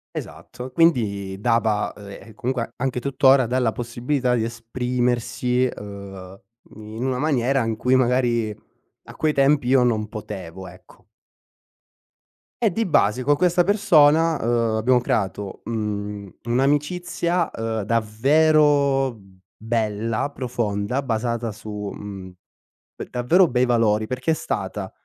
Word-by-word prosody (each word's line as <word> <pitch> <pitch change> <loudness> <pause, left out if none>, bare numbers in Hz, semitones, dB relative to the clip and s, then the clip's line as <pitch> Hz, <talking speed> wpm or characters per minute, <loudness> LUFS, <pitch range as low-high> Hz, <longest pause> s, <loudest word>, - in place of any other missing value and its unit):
Esatto, 125 +1 -8
quindi 100 - +1
dava, 110 -2 +1
ehm, 100 0 -11
e 110 - -13
comunque, 125 -2 -3
anche 125 -1 -2
tuttora, 135 0 +4
dà 125 +3 0
la 120 -3 +1
possibilità 125 +2 -1
di 115 - 0
esprimersi, 125 +1 -1
ehm, 100 -4 -8 0.3
in 110 +3 -6
una 130 -1 -1
maniera 135 -2 +1
in 115 -1 -2
cui, 125 +3 +2
magari 120 -3 +1 0.5
a - - -13
quei 155 -1 +1
tempi 140 -1 +2
io 130 0 +4
non 110 -3 0
potevo, 95 -4 -8
ecco. 90 +1 -18 1.6
E 220 - +4
di 225 +5 -1
base 130 - +2
co' 145 +3 +3
questa 175 +2 +3
persona, 165 -5 +4
uhm, 115 -1 +1
abbiamo 125 +3 +3
creato, 100 -3 -2
mhmm, 105 -2 -4
un'amicizia, 150 +7 0
ehm, 115 -1 -3
davvero 135 +4 +2 0.4
bella, 110 +1 -1
profonda 120 -3 -2
basata 115 -2 -2
su, 105 -1 -6
mhmm, 100 -2 -8 0.7
uhm, - - -6
davvero 165 +10 +3
bei 125 -3 +1
valori 110 -3 +2
perché 130 +6 -1
è - - +4
stata 155 - -4
120 Hz, 125 wpm, -22 LUFS, 110-135 Hz, 1.6 s, tuttora